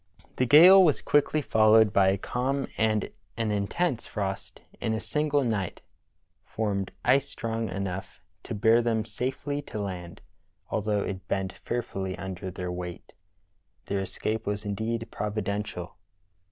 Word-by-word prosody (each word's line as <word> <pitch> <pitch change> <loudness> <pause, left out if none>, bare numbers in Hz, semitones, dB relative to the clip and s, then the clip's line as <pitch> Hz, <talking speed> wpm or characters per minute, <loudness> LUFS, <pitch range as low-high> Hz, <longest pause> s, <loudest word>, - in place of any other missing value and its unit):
The 130 - +2
gale 180 +8 +9
was 155 -5 +3
quickly 145 +1 +2
followed 110 -2 +5
by 95 -1 +5
a 95 +1 +3
calm, 135 +6 -1
and 110 -2 +1 0.3
an 115 -2 0
intense 115 - -1
frost 95 -2 -4 0.2
in 110 - -1
a - - -2
single 150 +1 0
night 105 -7 -2 0.6
formed 100 -3 -2
ice 140 +1 +3
strong 115 -1 -3
enough 95 0 -5 0.3
to - - -4
bear 110 +3 +4
them 115 -2 0
safely 130 +6 -3
to 115 -6 -7
land, 90 -4 -6 0.5
although 105 -1 0
it 95 -2 -5
bent 95 -1 -1
fearfully 95 -6 -4
under 95 0 -5
their 90 -1 -5
weight. 90 -1 -7 0.7
Their 100 - -1
escape 105 +3 -3
was 105 +1 -2
indeed 110 +3 -2
providential. 105 -3 -3
105 Hz, 140 wpm, -27 LUFS, 95-120 Hz, 0.7 s, gale